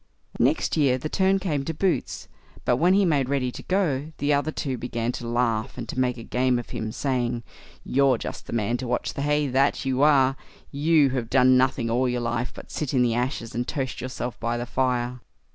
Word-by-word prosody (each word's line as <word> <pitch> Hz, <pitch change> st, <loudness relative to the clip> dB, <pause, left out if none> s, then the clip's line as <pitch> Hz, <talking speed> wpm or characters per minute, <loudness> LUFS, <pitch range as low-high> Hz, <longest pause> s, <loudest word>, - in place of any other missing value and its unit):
Next 135 Hz, +6 st, +2 dB
year 135 Hz, -4 st, +3 dB
the 155 Hz, +4 st, -5 dB
turn 190 Hz, +2 st, +2 dB
came 155 Hz, -8 st, -1 dB
to 160 Hz, +3 st, -4 dB
Boots; 185 Hz, +2 st, -1 dB, 0.4 s
but -, -, +3 dB
when 180 Hz, +4 st, +4 dB
he 200 Hz, 0 st, +4 dB
made 140 Hz, -6 st, +1 dB
ready 135 Hz, -3 st, 0 dB
to -, -, -8 dB
go, 160 Hz, -6 st, 0 dB
the 145 Hz, +1 st, +1 dB
other 145 Hz, +2 st, +1 dB
two 135 Hz, -4 st, -3 dB
began 120 Hz, -1 st, -2 dB
to 120 Hz, -1 st, -6 dB
laugh 115 Hz, -2 st, 0 dB
and 120 Hz, -2 st, -5 dB
to 130 Hz, -, -3 dB
make 125 Hz, -2 st, -1 dB
game 125 Hz, 0 st, +2 dB
of 120 Hz, -, -6 dB
him, 110 Hz, 0 st, -4 dB
saying, 120 Hz, -2 st, -1 dB, 0.4 s
"You're 135 Hz, -2 st, +3 dB
just -, -, -7 dB
the -, -, -7 dB
man 115 Hz, +1 st, 0 dB
to 125 Hz, -, -5 dB
watch 125 Hz, 0 st, -1 dB
the -, -, -4 dB
hay, 150 Hz, +1 st, +1 dB
that 135 Hz, +2 st, +1 dB
you 130 Hz, 0 st, 0 dB
are; 135 Hz, -3 st, +4 dB, 0.3 s
you, 150 Hz, 0 st, +3 dB
who 130 Hz, -, -1 dB
have 115 Hz, -2 st, -3 dB
done 130 Hz, 0 st, +5 dB
nothing 125 Hz, -2 st, +2 dB
all 125 Hz, +2 st, +2 dB
your 125 Hz, 0 st, -1 dB
life 120 Hz, +1 st, -2 dB
but -, -, -12 dB
sit 145 Hz, -3 st, -3 dB
in 125 Hz, -, +4 dB
the 120 Hz, -2 st, +2 dB
ashes 120 Hz, -1 st, -2 dB
and 120 Hz, +1 st, -2 dB
toast 135 Hz, -4 st, -3 dB
yourself 125 Hz, -1 st, -5 dB
by 120 Hz, 0 st, -1 dB
the 120 Hz, -, -3 dB
fire." 125 Hz, -1 st, -1 dB
130 Hz, 220 wpm, -25 LUFS, 120-145 Hz, 0.4 s, done